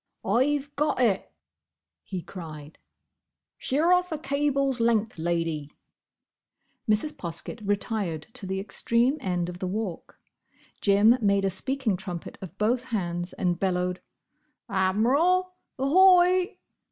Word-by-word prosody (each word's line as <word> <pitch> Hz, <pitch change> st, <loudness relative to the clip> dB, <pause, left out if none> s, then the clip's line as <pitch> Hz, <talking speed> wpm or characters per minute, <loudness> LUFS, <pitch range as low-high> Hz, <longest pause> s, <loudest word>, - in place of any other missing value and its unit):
"I've 280 Hz, +7 st, +1 dB
got 300 Hz, -1 st, 0 dB
it!" 220 Hz, -7 st, +1 dB, 0.7 s
he 185 Hz, -3 st, -6 dB
cried. 155 Hz, -4 st, -10 dB, 0.8 s
"Sheer 310 Hz, +6 st, +2 dB
off 360 Hz, -1 st, +2 dB
a 315 Hz, -, -1 dB
cable's 275 Hz, -2 st, 0 dB
length, 225 Hz, -4 st, +1 dB
Lady." 165 Hz, -3 st, -1 dB, 1.2 s
Mrs. 215 Hz, +8 st, +2 dB
Poskett 170 Hz, +6 st, -6 dB
retired 200 Hz, -5 st, -1 dB
to 220 Hz, -7 st, -5 dB
the 190 Hz, 0 st, -2 dB
extreme 235 Hz, +7 st, +1 dB
end 180 Hz, -5 st, -1 dB
of 180 Hz, 0 st, -7 dB
the 185 Hz, -, -3 dB
Walk. 195 Hz, -2 st, -5 dB, 0.6 s
Jim 210 Hz, +5 st, +5 dB
made 200 Hz, -2 st, +2 dB
a 195 Hz, -, +1 dB
speaking 245 Hz, +1 st, -1 dB
trumpet 180 Hz, -2 st, -7 dB
of 190 Hz, 0 st, -9 dB
both 235 Hz, +4 st, +1 dB
hands 175 Hz, -6 st, -3 dB
and 180 Hz, -2 st, -1 dB
bellowed, 180 Hz, -1 st, 0 dB, 0.7 s
"Admiral, 265 Hz, -, +2 dB, 0.2 s
ahoy!" 360 Hz, +5 st, +5 dB
210 Hz, 115 wpm, -26 LUFS, 180-275 Hz, 1.2 s, Jim